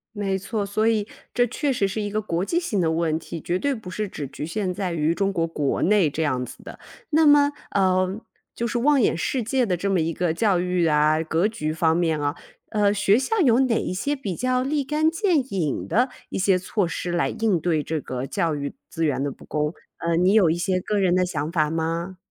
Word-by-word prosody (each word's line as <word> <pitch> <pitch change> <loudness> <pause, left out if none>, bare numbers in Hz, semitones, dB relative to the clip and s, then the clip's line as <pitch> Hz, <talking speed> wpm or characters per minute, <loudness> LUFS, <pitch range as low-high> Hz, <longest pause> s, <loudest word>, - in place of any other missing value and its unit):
没 195 -2 -1
错， 205 +2 -3
所 215 +3 0
以 215 -2 +1 0.3
这 245 - +3
确 285 +5 -1
实 205 -6 +1
是 210 +3 -3
一 205 - -2
个 215 +1 -1
国 175 -3 -2
际 335 - 0
性 215 - -1
的 160 - +1
问 160 -1 0
题， 165 - -7
绝 175 +4 -2
对 285 +4 0
不 220 -6 -9
是 210 +3 -3
只 150 -7 -6
局 145 - -6
限 185 +2 -2
在 190 -1 -3
于 160 -1 +1
中 195 +2 0
国 165 -3 0
国 150 -4 -1
内 195 -4 +4
这 160 +3 -2
样 130 -4 0
子 - - -12
的。 - - -10 0.3
那 315 +1 +4
么， 290 0 +6 0.2
呃， 185 0 +1 0.4
就 235 - -2
是 240 0 -1
望 285 +2 +4
眼 210 - +2
世 240 +9 -1
界 255 +2 +1
的 180 -5 0
这 200 +4 -2
么 185 - +2
一 165 +1 0
个 175 0 0
教 190 +1 +2
育 180 -1 +1
啊、 150 +1 +3
格 165 +4 +1
局 155 -8 -3
方 160 0 +2
面 165 -3 +1
啊， 145 0 -1 0.3
呃， 205 -2 +2
学 205 +2 +3
校 430 +12 -1
有 250 -6 +4
哪 255 -3 +2
一 - - -3
些 280 +10 -1
比 205 -10 -4
较 255 +3 0
立 285 +2 0
竿 305 +3 +1
见 355 -1 +2 0.2
影 160 -8 -1
的 250 +4 +2 0.2
一 - - -3
些 190 -1 +3
措 185 0 -1
施 175 +1 -4
来 175 - +1
应 215 -6 0
对 160 -3 0
这 160 0 -3
个 130 0 -4
教 160 +2 -1
育 140 -1 -4 0.2
资 165 0 -1
源 135 -2 0
的 145 - -1
不 - - -14
公？ 150 +1 -1 0.3
呃， 170 0 0
你 180 +3 +3
有 200 -7 +5
一 165 - +2
些 185 +1 0
个 210 +3 -2
人 185 -2 +3
的 185 0 +3
想 155 -3 -3
法 155 -3 +1
吗？ 165 +3 -2
185 Hz, 260 characters per minute, -24 LUFS, 165-220 Hz, 0.4 s, 么